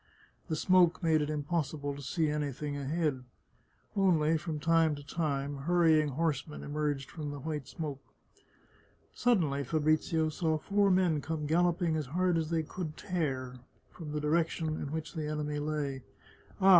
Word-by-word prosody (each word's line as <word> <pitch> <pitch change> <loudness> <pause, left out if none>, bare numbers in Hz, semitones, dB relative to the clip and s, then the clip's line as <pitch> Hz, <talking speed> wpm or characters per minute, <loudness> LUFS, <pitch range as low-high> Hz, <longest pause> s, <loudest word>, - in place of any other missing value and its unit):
The 160 - -1
smoke 180 +1 +4
made 160 -2 +4
it 150 - -1
impossible 150 -1 -2
to 140 - -8
see 160 +4 0
anything 150 -1 -2
ahead. 145 -1 -1 0.7
Only, 165 -5 +3
from 160 -1 -3
time 165 -1 +3
to 145 - -9
time, 145 -2 -2
hurrying 160 0 +3
horsemen 150 +1 -2
emerged 145 -2 -2
from 150 -3 -5
the 145 - -5
white 150 -1 -4
smoke. 145 -5 -5 1.1
Suddenly 165 - +2
Fabrizio 155 +2 +1
saw 160 0 0
four 200 +5 +2
men 180 -5 +3
come 155 0 -3
galloping 170 +1 +2
as 155 -4 -2
hard 180 +5 +1
as 160 -1 -2
they 165 -1 +1
could 155 -1 -6
tear 130 -9 -2 0.3
from 155 -4 -8
the 150 - -1
direction 160 +1 +1
in 155 -2 -3
which 160 0 -4
the 155 -2 -3
enemy 150 -1 -2
lay. 145 -3 -2 0.3
" - - -26
Ah! 195 - +5
155 Hz, 155 wpm, -31 LUFS, 145-165 Hz, 1.1 s, Ah